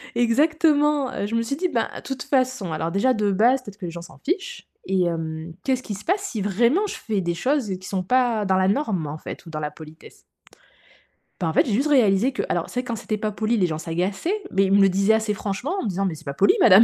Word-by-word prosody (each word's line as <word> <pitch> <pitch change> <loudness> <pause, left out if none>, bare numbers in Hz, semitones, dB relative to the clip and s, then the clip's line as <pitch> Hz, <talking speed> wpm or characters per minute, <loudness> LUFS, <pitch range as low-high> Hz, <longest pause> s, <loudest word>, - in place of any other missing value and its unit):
Exactement! 295 +3 +3
Heu, 200 - -2
je 230 - -3
me 230 - +2
suis 230 +4 -2
dit: 360 +5 0
«Ben, - - 0
de - - -7
toute 265 -2 -5
façon, 255 - 0
alors, 160 +1 -2
déjà, 205 +8 +2
de 210 -2 +1
base, 240 +7 +3
peut-être 205 -2 -11
que 185 - -7
les 170 - -4
gens 170 - -7
s'en 170 - -13
fichent, 395 - -3 0.2
et 190 -1 +1
hem, 160 -1 -3
qu'est-ce 260 -1 0
qui 210 - -5
se 200 - -11
passe 385 +3 +1
si, 230 - -4
vraiment, 235 - +2
je - - -5
fais 210 -4 -2
des 170 -1 -1
choses 255 - 0
qui 185 - -10
sont 190 -2 -2
pas 240 0 +2
dans 190 -1 +2
la 190 0 +3
norme, 200 - 0
en 145 +2 -5
fait, 170 - -9
ou 165 - -10
dans 155 - -5
la 150 0 -3
politesse?» 155 0 -14 1.2
Bah, 170 - 0
en 160 - -1
fait, - - +4
j'ai 230 - -1
juste 270 +8 +2
réalisé 250 -3 +3
que - - -2
alors, - - -1
c'est 250 - -2
vrai, - - -16
quand 235 -1 -3
c'était 215 +1 -3
pas 215 0 -2
poli, 220 +3 0
les 190 - +3
gens 155 -2 -3
s'agaçaient, 195 - -2
mais 195 - +3
ils 190 - -1
me 200 - +6
le 195 - +6
disaient 195 +3 +3
assez 220 -1 +1
franchement, 205 - -3
en - - -3
me - - -2
disant: 195 +1 -1
«Mais 175 - -1
c'est 160 - -14
pas 140 - -4
poli, 200 +7 +4
madame.» 210 +1 +8
210 Hz, 270 wpm, -23 LUFS, 185-255 Hz, 1.2 s, madame